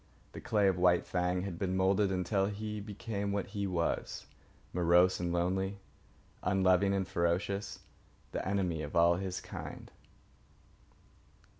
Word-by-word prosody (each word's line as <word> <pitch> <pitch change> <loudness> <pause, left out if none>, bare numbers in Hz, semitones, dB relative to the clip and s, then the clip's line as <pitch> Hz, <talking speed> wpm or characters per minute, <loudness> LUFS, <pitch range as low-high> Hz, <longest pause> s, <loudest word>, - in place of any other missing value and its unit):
The - - -9
clay 110 -5 +2
of 95 -2 +1
White 90 -1 +4
Fang 90 0 0
had 95 -4 -5
been 95 -1 -1
moulded 95 +1 +3
until 95 +1 +1
he 105 +1 -4
became 100 0 -4
what 100 -1 -2
he 100 -1 -2
was, 85 -3 -2 0.5
morose 90 +1 +4
and 90 -1 -1
lonely, 95 +3 0 0.6
unloving 95 0 +3
and 95 -1 -1
ferocious, 90 +4 -1 0.5
the - - -3
enemy 90 -4 -1
of 75 +2 -6
all 85 0 +5
his 95 -1 -3
kind. - - -8
95 Hz, 135 wpm, -32 LUFS, 90-100 Hz, 0.6 s, all